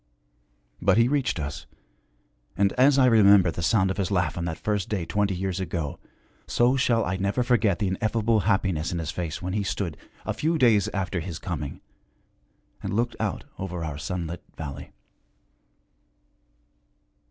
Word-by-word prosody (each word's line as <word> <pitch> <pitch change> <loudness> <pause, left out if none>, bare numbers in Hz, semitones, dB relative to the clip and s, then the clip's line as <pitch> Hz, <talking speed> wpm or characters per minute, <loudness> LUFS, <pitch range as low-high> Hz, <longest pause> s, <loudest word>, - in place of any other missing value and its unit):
But - - +4
he 115 +1 +5
reached 135 - 0
us, 75 0 -5 0.9
and 100 +1 +3
as 135 +2 +4
I 130 - +6
remember 100 -6 +6
the 85 - -5
sound 95 +2 +2
of - - -4
his 95 -3 -1
laugh 90 -5 0
on 85 - -3
that 80 -1 -3
first 105 -1 -2
day 95 -6 -1
twenty 100 +1 0
years 95 0 -2
ago, 85 -5 -3 0.5
so 120 +2 +3
shall 120 -4 +2
I 95 +2 -1
never 100 +6 0
forget 115 -6 +2
the 100 -3 0
ineffable 110 +3 +1
happiness 95 -5 0
in 90 - -2
his 80 -2 -3
face 85 -1 -4
when 90 +1 -3
he 105 - 0
stood, 95 -4 -3 0.3
a - - -1
few 160 +2 0
days 115 -8 +4
after 95 -2 -2
his 85 -1 -5
coming, 80 -8 -5 1.0
and - - -3
looked 120 +2 0
out - - -2 0.2
over 90 -3 -4
our 75 -2 -5
sunlit 85 +1 -4 0.2
valley. 70 -3 -7
95 Hz, 165 wpm, -26 LUFS, 85-110 Hz, 1.0 s, I